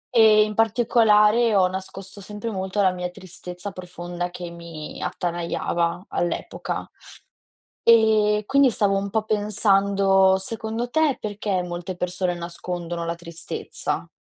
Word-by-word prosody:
E 215 Hz, -2 st, +7 dB
in 215 Hz, 0 st, -3 dB
particolare 225 Hz, 0 st, +4 dB
ho 185 Hz, -2 st, +5 dB
nascosto 190 Hz, +1 st, -7 dB
sempre 210 Hz, +3 st, -6 dB
molto 190 Hz, +1 st, -3 dB
la 185 Hz, -, +4 dB
mia 180 Hz, 0 st, -4 dB
tristezza 180 Hz, +1 st, -9 dB
profonda 175 Hz, -1 st, -6 dB
che 175 Hz, -1 st, -7 dB
mi 170 Hz, -2 st, -9 dB
attanagliava, 170 Hz, 0 st, -2 dB
all'epoca. 175 Hz, -1 st, -3 dB, 1.0 s
E 215 Hz, -2 st, +4 dB
quindi 275 Hz, -1 st, +5 dB
stavo 205 Hz, -3 st, +1 dB
un 195 Hz, 0 st, -1 dB
po' 220 Hz, +1 st, 0 dB
pensando, 200 Hz, -2 st, +3 dB
secondo 225 Hz, +4 st, -3 dB
te, 310 Hz, 0 st, +2 dB
perché 205 Hz, -3 st, -2 dB
molte 175 Hz, +1 st, -5 dB
persone 180 Hz, 0 st, -1 dB
nascondono 175 Hz, 0 st, -4 dB
la 170 Hz, 0 st, -2 dB
tristezza? 170 Hz, 0 st, -4 dB
195 Hz, 120 wpm, -23 LUFS, 175-215 Hz, 1.0 s, E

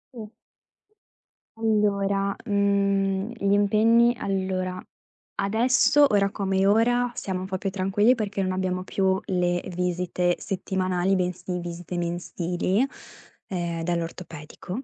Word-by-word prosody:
Sì. 220 Hz, -3 st, -7 dB, 1.3 s
Allora, 200 Hz, -3 st, +1 dB
mhmm, 200 Hz, -1 st, +1 dB
gli 200 Hz, -2 st, +1 dB
impegni 225 Hz, +4 st, +4 dB
allora, 190 Hz, -2 st, -2 dB, 0.6 s
adesso, 245 Hz, +8 st, +3 dB
ora 200 Hz, -1 st, +3 dB
come 195 Hz, -1 st, 0 dB
ora, 245 Hz, +4 st, +3 dB
siamo 190 Hz, -2 st, -3 dB
un -, -, -4 dB
po' 190 Hz, 0 st, -3 dB
più 195 Hz, -, -2 dB
tranquilli 195 Hz, +5 st, +2 dB
perché 205 Hz, -4 st, -3 dB
non 185 Hz, -1 st, 0 dB
abbiamo 185 Hz, 0 st, -2 dB
più 190 Hz, 0 st, +1 dB
le 175 Hz, -1 st, 0 dB
visite 180 Hz, 0 st, 0 dB
settimanali, 185 Hz, -1 st, -1 dB
bensì 180 Hz, 0 st, -2 dB
visite 175 Hz, 0 st, -6 dB
mensili, 175 Hz, +4 st, -1 dB, 0.6 s
ehm, 170 Hz, -3 st, -3 dB
dall'ortopedico. 170 Hz, -, -5 dB
190 Hz, 110 wpm, -25 LUFS, 180-205 Hz, 1.3 s, impegni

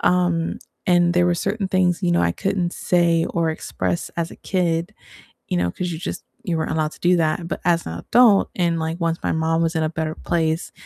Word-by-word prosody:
um, 175 Hz, -2 st, +1 dB, 0.3 s
and 175 Hz, -1 st, +4 dB
there 175 Hz, 0 st, +4 dB
were 175 Hz, -1 st, +2 dB
certain 195 Hz, +3 st, -2 dB
things, 185 Hz, -2 st, +1 dB
you 85 Hz, -, +2 dB
know, 85 Hz, -, +3 dB
I 85 Hz, 0 st, +2 dB
couldn't 185 Hz, -, -1 dB
say 170 Hz, -2 st, +2 dB
or 165 Hz, -1 st, 0 dB
express 165 Hz, +2 st, -3 dB
as 165 Hz, 0 st, -1 dB
a -, -, -11 dB
kid, 175 Hz, 0 st, -1 dB, 0.6 s
you -, -, -1 dB
know, 85 Hz, 0 st, +1 dB
'cause 180 Hz, -, -4 dB
you 160 Hz, -, -5 dB
just 190 Hz, -, -5 dB, 0.2 s
you 170 Hz, -3 st, 0 dB
weren't 160 Hz, -, -2 dB
allowed 155 Hz, -1 st, 0 dB
to -, -, -15 dB
do 180 Hz, 0 st, +4 dB
that, 165 Hz, +1 st, 0 dB
but 155 Hz, -, -3 dB
as 170 Hz, -1 st, +2 dB
an 80 Hz, -, -4 dB
adult, 230 Hz, -, +4 dB
and, 170 Hz, -2 st, +1 dB
like, 160 Hz, +2 st, -3 dB
once 165 Hz, 0 st, +1 dB
my -, -, +1 dB
mom 160 Hz, +1 st, +1 dB
was 165 Hz, +1 st, 0 dB
in 160 Hz, -, 0 dB
a 155 Hz, -, +1 dB
better 160 Hz, -1 st, -3 dB
place, 160 Hz, -1 st, -1 dB
170 Hz, 225 wpm, -22 LUFS, 160-180 Hz, 0.6 s, and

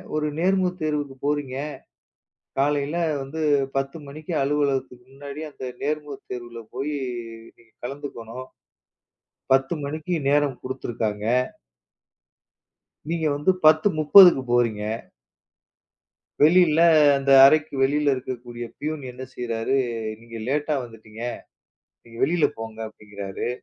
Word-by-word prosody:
ஒரு 150 Hz, 0 st, 0 dB
நேர்முகத் 185 Hz, 0 st, +1 dB
தேர்வுக்கு 150 Hz, -3 st, -2 dB
போறீங்க. 145 Hz, -3 st, -1 dB, 1.0 s
காலைல 145 Hz, +2 st, +1 dB, 0.3 s
வந்து 140 Hz, +4 st, -6 dB, 0.4 s
10:00 135 Hz, +2 st, -2 dB
மணிக்கு 155 Hz, +4 st, -8 dB
அலுவலகத்துக்கு 135 Hz, -3 st, -1 dB
முன்னாடியே 145 Hz, +3 st, -7 dB
அந்த 135 Hz, -, -9 dB, 0.2 s
நேர்முகத் 150 Hz, -1 st, -4 dB
தேர்வுல 120 Hz, -1 st, -7 dB
போயி 145 Hz, +3 st, -2 dB, 0.6 s
நீங்கக் 115 Hz, -1 st, -27 dB
கலந்துக்கணும். 130 Hz, -2 st, -7 dB, 1.1 s
10:00 135 Hz, +4 st, +3 dB
மணிக்கு 155 Hz, +5 st, -3 dB
நேரம் 145 Hz, -3 st, +2 dB
குடுத்திருக்காங்க. 115 Hz, -5 st, -3 dB, 1.8 s
நீங்க 165 Hz, -1 st, -1 dB
வந்து 150 Hz, +6 st, +2 dB
10:30க்கு 155 Hz, 0 st, +7 dB
போறீங்க. 115 Hz, -4 st, +2 dB, 1.6 s
வெளியில 165 Hz, -1 st, +5 dB, 0.4 s
அந்த 135 Hz, 0 st, 0 dB
அறைக்கு 155 Hz, +1 st, +4 dB
வெளியில 145 Hz, +1 st, +2 dB
இருக்கக்கூடிய 120 Hz, -2 st, -6 dB
பியூன் 155 Hz, -1 st, -4 dB
என்ன 130 Hz, +1 st, -9 dB
செய்றாரு? 115 Hz, +2 st, -1 dB, 0.4 s
நீங்க 115 Hz, 0 st, -10 dB
லேட்டா 150 Hz, +2 st, 0 dB
வந்துட்டீங்க. 110 Hz, -1 st, -13 dB, 0.8 s
நீங்க 115 Hz, -1 st, -14 dB
வெளியில 165 Hz, +2 st, +2 dB
போங்க 110 Hz, 0 st, -7 dB
அப்படிங்கிறாரு. 100 Hz, -1 st, -6 dB
140 Hz, 100 wpm, -24 LUFS, 120-150 Hz, 1.8 s, 10:30க்கு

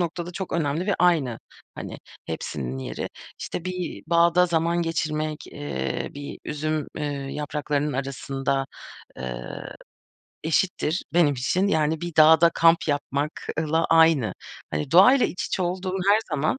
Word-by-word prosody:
noktada 175 Hz, +1 st, -3 dB
çok 190 Hz, +1 st, -5 dB
önemli 160 Hz, +2 st, 0 dB
ve 200 Hz, -, +2 dB
aynı, 155 Hz, -10 st, +2 dB, 0.4 s
hani, -, -, -7 dB, 0.3 s
hepsinin 65 Hz, 0 st, -4 dB
yeri. 65 Hz, -, -5 dB, 0.3 s
İşte, 175 Hz, -, -5 dB
bir 180 Hz, -2 st, -4 dB
bağda 170 Hz, +1 st, +4 dB
zaman 170 Hz, 0 st, +1 dB
geçirmek, 155 Hz, -2 st, -2 dB
eee, 145 Hz, 0 st, -4 dB
bir 145 Hz, 0 st, -7 dB
üzüm, 155 Hz, 0 st, -2 dB
eee, 150 Hz, -, -2 dB, 0.3 s
yapraklarının 150 Hz, 0 st, -2 dB
arasında, 135 Hz, 0 st, -2 dB, 0.5 s
ııı, 60 Hz, -1 st, -6 dB, 0.7 s
eşittir 165 Hz, 0 st, 0 dB
benim 160 Hz, -5 st, +4 dB
için, 135 Hz, +10 st, +1 dB
yani, 155 Hz, -3 st, +1 dB
bir 175 Hz, -1 st, -5 dB
dağda 160 Hz, +2 st, +7 dB
kamp 165 Hz, 0 st, +4 dB
yapmakla 150 Hz, +2 st, -1 dB
aynı. 160 Hz, -, +4 dB, 0.4 s
Hani, 75 Hz, 0 st, -3 dB
doğayla 220 Hz, +10 st, +7 dB
iç 180 Hz, -, -4 dB
içe 185 Hz, -, -1 dB
olduğum 185 Hz, +1 st, -2 dB
her 205 Hz, +1 st, +6 dB
zaman, 155 Hz, -, 0 dB
160 Hz, 130 wpm, -25 LUFS, 145-175 Hz, 0.7 s, dağda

